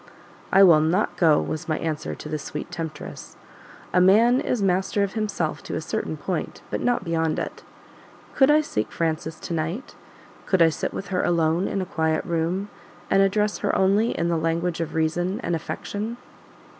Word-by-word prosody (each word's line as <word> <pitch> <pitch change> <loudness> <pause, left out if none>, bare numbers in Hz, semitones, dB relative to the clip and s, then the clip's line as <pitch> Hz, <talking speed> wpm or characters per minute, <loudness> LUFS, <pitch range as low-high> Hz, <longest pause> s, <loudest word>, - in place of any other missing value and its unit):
"I 195 +1 +7
will 170 -5 +7
NOT 165 +7 +1
go 160 -4 +4
was 155 +1 -4
my 155 - +1
answer 155 -2 -3
to - - -9
the 155 0 -3
sweet 155 - -6
temptress. 160 -4 -7 0.6
A 180 - +5
man 225 +7 +5
is 250 - -1
master 195 +1 +1
of 195 - -2
himself 215 -2 -2
to - - -6
a - - -1
certain - - -3
point, - - -4
but - - -2
not 245 -1 +1
beyond 165 -1 0
it. - - -4 0.7
Could 270 0 +4
I 300 +1 +6
seek 110 - -3
Frances 160 -1 -2
to - - -5
night, 165 - -3 0.5
could 190 - +2
I 165 - +6
sit 155 - -3
with 195 - -6
her 185 -2 0
alone 165 +1 +2
in 195 - -1
a - - -5
quiet 160 -2 0
room, 175 +3 -1 0.4
and 195 - +5
address 210 +2 +1
her - - 0
only 200 +4 +2
in 170 - 0
the 170 -1 +1
language 165 +1 -1
of 165 - -4
Reason 175 +4 0
and 170 - 0
Affection?" 210 +7 -5
175 Hz, 185 wpm, -24 LUFS, 160-200 Hz, 0.7 s, I